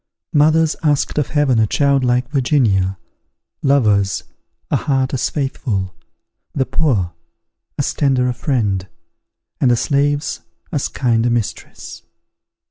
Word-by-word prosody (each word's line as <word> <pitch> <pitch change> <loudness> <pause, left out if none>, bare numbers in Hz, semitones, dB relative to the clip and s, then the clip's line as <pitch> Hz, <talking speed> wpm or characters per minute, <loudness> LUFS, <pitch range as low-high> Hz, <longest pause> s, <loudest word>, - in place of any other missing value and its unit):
Mothers 155 +2 +3
asked 150 -1 +1
of 145 - 0
heaven 135 -3 +2
a 110 - +3
child 140 +2 +2
like 125 0 +1
Virginia; 115 -10 +1 0.6
lovers, 105 -9 +2 0.5
a - - +3
heart 135 -2 0
as 130 - 0
faithful; 115 - -2 0.6
the 135 - +1
poor, 110 - 0 0.6
as - - -1
tender 130 -3 +1
a 125 - 0
friend; 110 -7 -1 0.7
and 130 - +3
the 120 - +4
slaves 145 +3 0 0.3
as 145 -5 -1
kind 115 -3 0
a - - +2
mistress. 120 -3 -4
130 Hz, 125 wpm, -18 LUFS, 115-145 Hz, 0.7 s, the